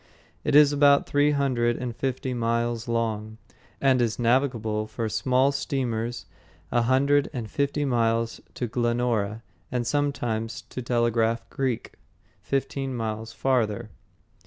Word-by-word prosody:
It - - +1
is 145 -1 +7
about 140 -1 +5
three 145 +1 +3
hundred 130 -5 +1
and 120 -2 -4
fifty 130 0 -2
miles 115 0 -1
long, 110 -2 -2 0.4
and 130 -2 +3
is 115 -2 0
navigable 115 -3 +1
for 110 +1 -3
small 130 +5 +2
steamers 120 -4 -2 0.5
a 120 - +3
hundred 140 +4 +3
and 120 -4 -4
fifty 145 +1 0
miles 115 -2 0
to 125 - -2
Glenora, 120 -2 0 0.3
and 125 -1 -1
sometimes 120 -5 -1
to 125 - -7
Telegraph 115 -1 +1
Creek, 130 -4 -2 0.5
fifteen 135 -1 -2
miles 110 -1 -4
farther. 115 -3 0
120 Hz, 125 wpm, -26 LUFS, 115-135 Hz, 0.5 s, is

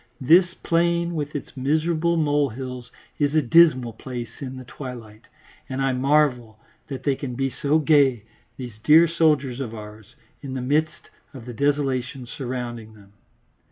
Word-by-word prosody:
This 175 +7 +4
plain 170 0 +1
with 150 -2 -4
its 145 - -6
miserable 160 +5 0
molehills 135 -5 -1 0.3
is 145 0 +1
a 155 - +5
dismal 130 -4 +4
place 120 +1 -7
in 130 -1 -6
the 130 - -8
twilight, 120 -4 -10 0.4
and 130 0 -4
I 135 -1 +1
marvel 130 -4 +1 0.3
that 135 -2 -7
they 140 -2 +1
can 130 -3 -6
be 135 +1 -1
so 145 +5 +1
gay, 140 -7 +3 0.3
these 120 -5 -8
dear 160 +3 +7
soldiers 150 -6 +1
of 115 -4 -5
ours, 105 -1 -11 0.3
in 135 -2 -6
the - - -2
midst 155 +4 -1 0.2
of 120 -3 -10
the 125 - -7
desolation 135 -1 -1
surrounding 120 -3 -6
them. 100 -1 -19
135 Hz, 155 wpm, -23 LUFS, 120-150 Hz, 0.4 s, dear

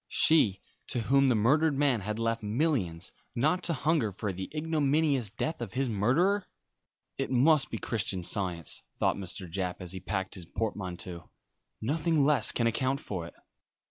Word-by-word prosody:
She, 110 -12 +4 0.3
to 120 - -1
whom 135 +4 +3
the 125 - +3
murdered 140 +7 +3
man 135 -6 +2
had 105 +2 -3
left 115 0 -1
millions, 105 - -1 0.2
not 155 +9 +2
to 170 - +2
hunger 150 -5 +1
for 100 +1 -4
the 95 +1 -6
ignominious 150 -5 +1
death 140 - -3
of 115 -5 -5
his 130 0 0
murderer! 160 - +2 0.7
"It - - -1
must 135 +3 +4
be - - -4
Christian 95 -5 -2
Science," 85 -4 -2 0.2
thought - - +2
Mr. 95 -1 -5
Japp, 90 +1 -3
as 90 -2 -3
he 95 - -4
packed 95 +1 -3
his 90 -6 -8
portmanteau. 90 -4 -4 0.5
"Nothing 155 +5 +1
less 150 0 +4
can 115 - 0
account 130 +4 0
for 90 -9 -5
it." - - -14
115 Hz, 165 wpm, -29 LUFS, 95-145 Hz, 0.7 s, She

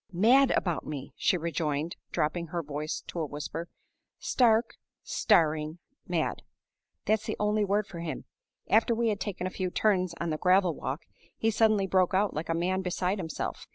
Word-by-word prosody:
"Mad 245 +9 +5
about 175 -4 -1
me!" 140 -3 -6
she 180 - +2
rejoined, 160 0 -2 0.2
dropping 170 +3 -1
her 170 +1 -3
voice 150 +1 -4
to 175 - -6
a 160 - 0
whisper. 150 +4 -5 0.5
"Stark, 230 -2 +2 0.3
staring 155 -5 +2 0.3
mad! - - -1 0.6
that's 215 0 +1
the - - -2
only 210 0 +2
word 205 +1 +1
for 190 -4 -9
him. 160 -5 -5 0.4
After 230 +2 +4
we 230 0 +1
had 205 -2 -1
taken 190 -3 -4
a 185 - -2
few 185 -1 -2
turns 185 -3 +1
on 170 -1 -1
the 155 - -2
gravel 185 -1 +4
walk, 140 +1 -4 0.3
he 225 - +1
suddenly 215 -2 +3
broke 185 -1 +2
out 200 +1 +2
like 155 +3 -4
a 165 - +1
man 185 +3 0
beside 185 +2 -1
himself. 165 -3 -4
180 Hz, 175 wpm, -29 LUFS, 160-210 Hz, 0.6 s, Mad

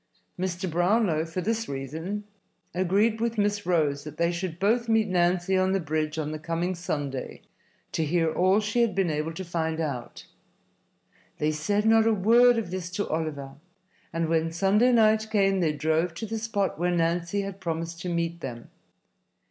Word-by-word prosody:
Mr. 185 0 -2
Brownlow, 175 -1 +2
for 165 +3 -4
this 225 +4 -1
reason, 160 +10 -4 0.5
agreed 200 +5 +1
with 230 0 -1
Miss 205 -1 0
Rose 150 -5 +1
that 150 - -9
they 170 0 +2
should 170 -1 -4
both 230 +5 +1
meet 225 -1 +3
Nancy 180 0 +1
on 185 0 +2
the 195 - +2
bridge 155 -1 -2
on 155 -1 -2
the 155 - -5
coming 165 +3 -2
Sunday 145 -6 -4 0.5
to 160 - 0
hear 160 +1 +1
all 185 +3 +3
she 220 +3 0
had 230 -3 +1
been 190 -4 +1
able 155 +2 -2
to 190 +3 -6
find 160 -2 -2
out. 140 -7 -4 1.1
They 150 +1 +1
said 200 +8 0
not 225 0 +5
a 225 - +3
word 235 +5 +5
of 215 -6 -3
this 185 -2 -4
to 205 +2 -2
Oliver, 150 -4 -3 0.6
and 165 0 -1
when 165 0 +1
Sunday 195 +8 +3
night 220 -2 +4
came 195 -3 +2
they 165 -4 +2
drove 160 +3 0
to 225 - -4
the 220 +1 -4
spot 205 -6 -1
where 175 +1 +1
Nancy 175 +3 0
had 195 -1 -6
promised 165 -2 -4
to 180 - -4
meet 170 0 -2
them. 120 -4 -7
175 Hz, 180 wpm, -26 LUFS, 160-205 Hz, 1.1 s, not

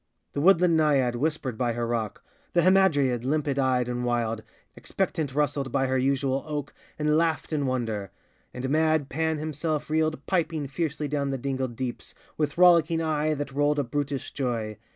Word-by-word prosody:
The 140 - -1
woodland 180 0 +5
Naiad 140 -6 +2
whispered 140 -4 -2
by 120 -2 +1
her 120 0 -2
rock; 115 -3 -3 0.3
The 175 - +3
Hamadryad, 145 -11 +3
limpid 140 0 0
eyed 130 -2 +2
and 125 0 -2
wild, 115 -2 -1 0.3
Expectant 145 -5 -2
rustled 145 -3 0
by 135 +1 +1
her 130 0 +1
usual 135 0 0
oak 150 -2 -4 0.2
And 150 0 +2
laughed 165 -1 0
in 145 -3 0
wonder; 110 -6 -2 0.4
and 125 +1 -4
mad 155 -2 +2
Pan 160 +2 0
himself 155 0 -3
Reeled 155 -2 0
piping 165 -5 0
fiercely 150 +2 -2
down 140 -1 -1
the 135 - -1
dingled 130 -2 -3
deeps, 125 0 -5 0.2
With 150 -1 -2
rollicking 170 -2 +5
eye 155 -1 0
that 145 -1 -4
rolled 145 +1 +2
a 145 - +2
brutish 140 +2 -3
joy. 115 -5 -3
145 Hz, 170 wpm, -26 LUFS, 130-155 Hz, 0.4 s, woodland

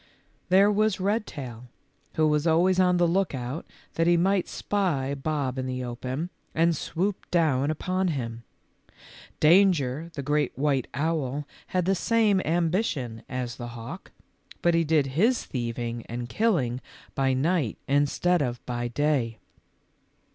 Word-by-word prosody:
There 195 +3 +6
was 210 -1 +1
Redtail, 145 - -3 0.5
who 155 -1 +3
was 150 +1 +1
always 180 +3 +3
on 180 -1 +4
the 175 -1 +3
lookout 160 -6 -1 0.3
that 165 0 +1
he 175 0 +5
might 190 +2 +2
spy 160 -10 -1
Bob 140 -2 -2
in 130 - -2
the 130 0 -3
open, 130 +7 -4 0.2
and 165 +1 +3
swoop 185 +6 -3
down 150 -5 +2
upon 185 +4 -1
him. 120 -7 -3 1.0
Danger, 160 -4 +4
the 140 - -4
great 150 +2 0
white 140 -3 +1
owl, 145 -2 -1 0.2
had 180 -2 0
the 195 - +3
same 210 0 +2
ambition 165 - 0
as 125 -2 -4
the 120 - -6
hawk, 115 0 -8 0.5
but 175 - +4
he 165 0 +3
did 155 -2 +2
his 200 - +1
thieving 120 -1 -3
and 120 +1 -5
killing 135 - +1 0.3
by 135 -1 +1
night 145 - 0
in 145 +1 +3
stead 175 +3 +1
of 125 -3 -3
by 120 -1 -2
day. 125 -3 0
150 Hz, 140 wpm, -26 LUFS, 130-180 Hz, 1.0 s, There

